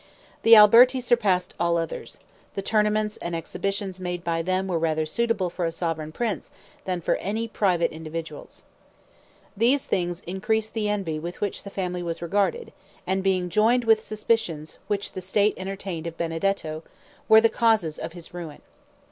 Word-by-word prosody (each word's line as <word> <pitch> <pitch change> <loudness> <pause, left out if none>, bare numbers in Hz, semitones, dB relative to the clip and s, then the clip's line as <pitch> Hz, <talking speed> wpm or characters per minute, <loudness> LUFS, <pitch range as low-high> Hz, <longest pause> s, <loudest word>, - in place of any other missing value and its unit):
The 225 0 +8
Alberti 235 +5 +8
surpassed 215 -7 +1
all 170 0 +2
others; 165 -1 -5 0.4
the 195 - -3
tournaments 210 0 +1
and 170 0 -4
exhibitions 190 +3 -3
made 180 -1 -4
by 165 -1 0
them 185 +2 0
were 175 -3 0
rather 160 -1 0
suitable 205 +1 0
for 180 - -4
a 165 - 0
sovereign 165 -2 -3
prince 220 +3 -3 0.4
than 180 -2 -2
for - - +1
any 220 +4 -3
private 185 -6 +1
individuals. 165 - -8 0.9
These 245 +6 +2
things 175 -1 -1
increased 215 +4 -2
the 215 -2 -1
envy 190 -7 -2
with 170 +3 -7
which 205 -2 -2
the 200 - -9
family 180 -2 -3
was 170 -1 -4
regarded, 205 - -1 0.3
and 190 +1 0
being 185 -2 +1
joined 225 +7 +3
with 225 -1 +4
suspicions 215 -8 -2
which 205 -1 -2
the 185 - -6
state 200 +3 +2
entertained 190 -3 -5
of 165 0 -7
Benedetto, 165 -1 -2 0.5
were 220 0 +9
the 230 - +5
causes 220 -10 +1
of 165 - -6
his 175 -1 -10
ruin. 170 -4 -8
190 Hz, 165 wpm, -25 LUFS, 170-215 Hz, 0.9 s, were